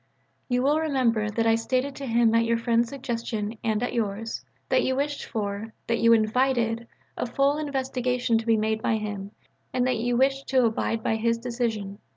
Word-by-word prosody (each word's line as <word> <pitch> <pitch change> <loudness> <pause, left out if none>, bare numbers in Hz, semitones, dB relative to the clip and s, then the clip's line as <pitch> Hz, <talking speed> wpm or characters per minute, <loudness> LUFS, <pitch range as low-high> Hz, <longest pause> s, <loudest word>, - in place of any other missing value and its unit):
You 250 0 +1
will 295 +3 +3
remember 250 -9 +1
that 225 +2 0
I 225 - +5
stated 255 +4 0
to 275 - -5
him 230 -1 +3
at 230 0 +4
your 230 0 +2
friend's 230 0 +1
suggestion 230 -5 -4
and 220 0 0
at 245 - -2
yours, 225 0 -2 0.3
that - - +4
you 260 - +1
wished 285 +1 -2
for, 210 0 -4
that 230 0 0
you 230 - +5
invited, 230 +1 +2 0.3
a - - -2
full 275 +4 +1
investigation 255 -4 0
to 225 - -7
be 225 -1 +4
made 220 0 0
by 225 - +1
him 205 -2 -4 0.4
and 250 -1 +1
that 255 -2 +1
you 240 +2 0
wished 270 +1 +2
to 260 -2 +3
abide 225 0 -1
by 220 - +1
his 230 +1 +1
decision. 230 -4 -3
230 Hz, 190 wpm, -26 LUFS, 225-255 Hz, 0.4 s, I